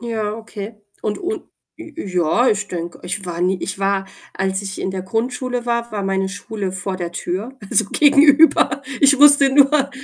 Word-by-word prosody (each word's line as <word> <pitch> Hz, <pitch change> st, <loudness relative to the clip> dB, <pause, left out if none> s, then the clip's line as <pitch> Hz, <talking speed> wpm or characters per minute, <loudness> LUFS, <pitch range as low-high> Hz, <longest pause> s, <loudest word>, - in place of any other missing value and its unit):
Ja, 220 Hz, -3 st, -3 dB
okay. 220 Hz, -1 st, -8 dB, 0.3 s
Und 210 Hz, -1 st, -2 dB
und 400 Hz, +4 st, -4 dB, 0.3 s
j 320 Hz, -2 st, -11 dB
ja, 185 Hz, -, +1 dB
ich 210 Hz, -1 st, 0 dB
denke, 170 Hz, -1 st, -6 dB
ich 190 Hz, +3 st, -5 dB
war 175 Hz, -1 st, -5 dB
nie 185 Hz, +1 st, +1 dB
ich -, -, -4 dB
war 195 Hz, 0 st, 0 dB, 0.3 s
als 190 Hz, +1 st, -2 dB
ich 195 Hz, -1 st, -6 dB
in 190 Hz, -, -2 dB
der 190 Hz, -1 st, -5 dB
Grundschule 245 Hz, +4 st, -3 dB
war, 235 Hz, 0 st, -2 dB
war 205 Hz, -, -3 dB
meine 195 Hz, 0 st, -1 dB
Schule 200 Hz, -1 st, -5 dB
vor 190 Hz, 0 st, -4 dB
der 175 Hz, -1 st, -5 dB
Tür, 205 Hz, +11 st, -5 dB
also 220 Hz, -, +2 dB
gegenüber. 285 Hz, +1 st, +4 dB, 0.2 s
Ich 280 Hz, 0 st, +6 dB
musste 285 Hz, -1 st, +7 dB
nur 280 Hz, 0 st, +4 dB
210 Hz, 180 wpm, -19 LUFS, 190-265 Hz, 0.3 s, musste